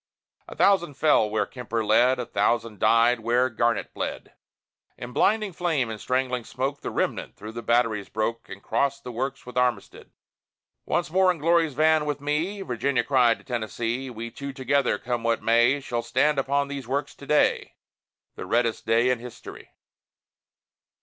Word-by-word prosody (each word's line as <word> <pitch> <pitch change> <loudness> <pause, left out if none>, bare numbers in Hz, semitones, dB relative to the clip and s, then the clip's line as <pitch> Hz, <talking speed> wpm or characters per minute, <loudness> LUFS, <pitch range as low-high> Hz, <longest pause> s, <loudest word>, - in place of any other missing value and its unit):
A - - -10
thousand 175 -7 +3
fell 145 -7 +3
where 110 0 0
Kemper 115 -3 -4
led; 120 +5 +4
A 125 - -3
thousand 110 0 0
died 115 +1 +4
where 120 +3 +1
Garnett 115 +1 0
bled; - - -5 0.6
In 120 +1 -8
blinding 210 - +1
flame 160 -9 -1
and 110 - -7
strangling 130 -1 -1
smoke, 135 +5 -4
The - - -4
remnant - - -2
through 105 +2 -9
the 120 +1 -6
batteries 115 -3 +1
broke, 115 +2 -3
And 100 - -10
crossed 140 0 -1
the 125 - -6
works 135 +3 -4
with 125 0 -3
Armistead. 125 -5 -2 0.8
"Once 175 -2 -1
more 190 +1 +4
in 180 - +1
Glory's 165 -2 +2
van 155 0 +3
with 145 -1 -2
me!" 155 +8 -2
Virginia 125 -2 0
cried 125 -3 +3
to - - -19
Tennessee: 120 +2 -3
"We 115 -1 -7
two 140 +3 -7
together, 135 -3 +1
come 120 +2 -3
what 115 -1 0
may, 120 +4 +4
Shall 120 -3 -3
stand 135 +5 +1
upon 140 +1 0
those 140 -3 -6
works 140 +3 -2
to 140 - -14
day!" 150 - +2 0.6
The - - -8
reddest 115 -1 0
day 115 +3 +3
in 125 - -1
history. 120 0 -11
125 Hz, 170 wpm, -25 LUFS, 115-140 Hz, 0.8 s, led